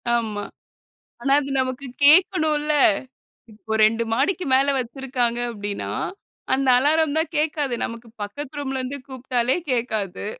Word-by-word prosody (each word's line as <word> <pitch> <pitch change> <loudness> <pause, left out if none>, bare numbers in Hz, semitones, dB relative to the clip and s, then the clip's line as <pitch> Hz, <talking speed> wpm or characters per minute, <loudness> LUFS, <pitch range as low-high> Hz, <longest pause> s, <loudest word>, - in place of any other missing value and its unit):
ஆமா. 215 -3 -2 0.8
ஆனா, 275 0 +2
அது 275 - -6
நமக்கு 260 +1 -4 0.2
கேட்கணும்ல்ல. 310 -2 +4 0.8
இப்ப 220 +1 -5
2 225 +1 +1
மாடிக்கு 345 +8 0
மேல 275 +1 +4
வச்சிருக்காங்க 245 -1 -2
அப்படீன்னா, 205 -2 -5 0.7
அந்த 270 0 -1
அலாரம் 305 +2 +2
தான் 320 +1 0
கேட்காது. 300 -4 0
நமக்கு 230 0 -8 0.2
பக்கத்து 285 +7 -7
ரூம்ல 265 -2 -3
இருந்து 275 +2 -5
கூப்பிட்டாலே 255 +1 -1
கேட்காது. 220 -6 -2
260 Hz, 120 wpm, -23 LUFS, 235-290 Hz, 0.8 s, கேட்கணும்ல்ல